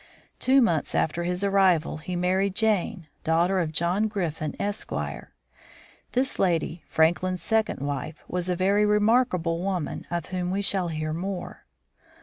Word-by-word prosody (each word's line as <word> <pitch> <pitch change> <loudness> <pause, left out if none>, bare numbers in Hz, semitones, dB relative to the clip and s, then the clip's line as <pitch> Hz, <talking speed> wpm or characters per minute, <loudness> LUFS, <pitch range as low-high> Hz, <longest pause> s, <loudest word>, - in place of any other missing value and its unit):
Two 265 0 +5
months 165 -9 0
after 170 +2 0
his 180 +2 -1
arrival 190 -6 +3
he 180 +4 -5
married 185 +2 +1
Jane, 205 -5 0 0.2
daughter 170 +4 +2
of 165 -3 -1
John 175 +7 +1
Griffin, 165 -7 -3
Esq. 205 0 -3 1.2
This 265 +2 0
lady, 170 -3 0
Franklin's 175 +3 +1
second 220 -9 0
wife, 145 +2 -4
was 180 0 -2
a 180 - +1
very 195 +3 +2
remarkable 210 -5 +2
woman, 185 -4 -3
of 170 -2 -2
whom 180 -1 -2
we 195 +2 -1
shall 190 -3 +2
hear 155 -1 -3
more. 180 +2 -5
180 Hz, 140 wpm, -26 LUFS, 165-200 Hz, 1.2 s, Two